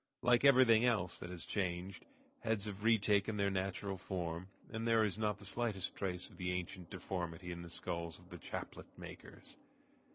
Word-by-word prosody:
Like 120 0 +5
everything 125 -5 +7
else, 110 -8 +2
that 90 - -6
has 90 -2 -6
changed; 90 -1 -2 0.3
heads 110 -3 0
have 105 -1 -5
re 115 0 +6
taken 105 +1 +2
their 100 -1 +2
natural 95 +1 -1
form, 90 -2 -3 0.2
and 115 +1 -2
there 115 -1 +5
is 105 0 0
not 105 -1 +1
the 100 - -11
slightest 100 -3 -1
trace 90 -2 -2
of - - -16
the 90 0 -1
ancient 90 -1 -4
deformity 90 -2 -4
in 85 0 -5
the 85 - -8
skulls 85 -1 -4
of - - -18
the - - -7
chaplet - - -6
makers. - - -11
95 Hz, 185 wpm, -37 LUFS, 90-110 Hz, 0.3 s, everything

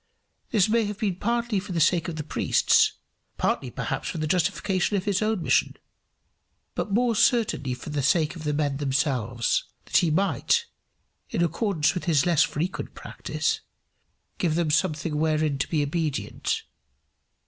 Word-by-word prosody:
This 210 -6 +3
may 225 0 +2
have 205 -1 -4
been 200 -4 -1
partly 235 0 0
for 190 -1 -6
the 170 - 0
sake 170 +2 +3
of 170 - -4
the 155 - -4
priests, 150 - +3 0.4
partly - - 0
perhaps - - -3
for - - -4
the 155 - -1
justification 185 +4 +1
of 190 - -3
his 200 -1 +1
own 215 -4 0
mission, - - +2 1.0
but - - -3
more 235 +2 +2
certainly 220 - +2
for 125 - -8
the 145 -1 -1
sake 155 +4 +2
of 165 - -8
the 150 - 0
men 145 -2 0
themselves, 130 -5 0 0.2
that - - +2
he 170 - +3
might, 200 - +1 0.6
in 185 -7 0
accordance 170 -1 +1
with 180 - -4
his 155 -5 +3 0.2
frequent 170 +5 -2
practice, - - -2 0.8
give 165 -3 +1
them 165 -2 +1
something 155 0 0
wherein 155 -2 +1
to - - 0
be 155 -3 +1
obedient. 150 -1 -2
170 Hz, 160 wpm, -26 LUFS, 150-200 Hz, 1.0 s, This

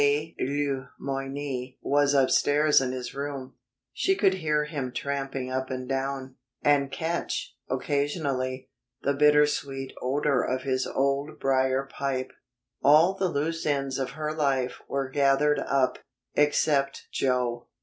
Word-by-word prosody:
K. 145 +3 +2
Le 140 -1 -1
Moyne 135 -1 -4
was 145 0 +3
upstairs 145 +2 +4
in 130 -1 -1
his 125 -1 -5
room. 140 -2 -5 0.4
She 385 - +2
could 195 - +3
hear 150 -4 0
him 145 -5 -4
tramping 135 0 -3
up 130 0 -2
and 130 -1 -4
down, 135 0 -3 0.3
and 140 -2 +3
catch, 170 +3 -3
occasionally, 140 -3 -1 0.3
the 140 - +2
bitter 150 +1 +5
sweet 135 -2 -4
odor 135 +1 +1
of 130 0 -2
his 130 -1 0
old 140 +2 -1
brier 130 0 +2
pipe. 135 -2 -3 0.5
All 155 +6 +6
the 195 0 -1
small 145 -4 0
loose 165 +1 -3
ends 140 -2 0
of 130 -2 -2
her 155 0 -2
life 135 -5 0
were 135 -1 -1
gathered 140 +2 +3
up 130 -2 +1 0.3
except 145 -1 +2
Joe. 125 -2 0
140 Hz, 140 wpm, -27 LUFS, 130-145 Hz, 0.5 s, All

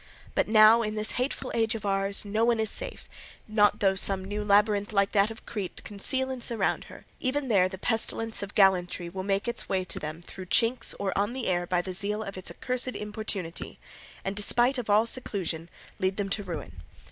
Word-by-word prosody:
But - - +1
now 215 +1 +7
in 215 -1 -2
this 215 0 +2
hateful 260 - -3
age 225 0 +1
of 215 - -6
ours 195 +1 +1
not 215 +3 +1
one 235 -2 +2
is 220 -1 +1
safe, - - -4 0.4
not 210 -1 +3
though 195 -1 +4
some 190 0 0
new 205 +2 -3
labyrinth 205 0 +3
like 200 -1 +2
that 200 +1 +3
of 225 0 -11
Crete 205 -5 -6
conceal 260 +6 +1
and 255 -2 -5
surround 225 -5 0
her; - - -13
even 270 0 -1
there 185 -4 +4
the 190 - -7
pestilence 225 +1 +1
of 200 0 -7
gallantry 180 -3 +3
will 190 +2 -5
make 195 +3 -1
its 235 - -3
way 190 -1 0
to - - -7
them 155 +3 -6
through 185 +1 -10
chinks 235 +6 +1
or 195 -2 -2
on 205 +4 0
the 260 -2 -4
air 175 -1 0
by 175 0 0
the 185 +1 -5
zeal 210 +3 0
of 195 -2 -7
its 185 - -5
accursed 255 0 -1
importunity, 210 -5 -5 0.5
and, 195 - -2
despite 240 +5 +3
of 230 - -6
all 210 +2 +5
seclusion, 185 -9 -3 0.3
lead 190 0 0
them 200 -1 -2
to 205 - 0
ruin. 165 - -7
205 Hz, 205 wpm, -27 LUFS, 190-225 Hz, 0.5 s, now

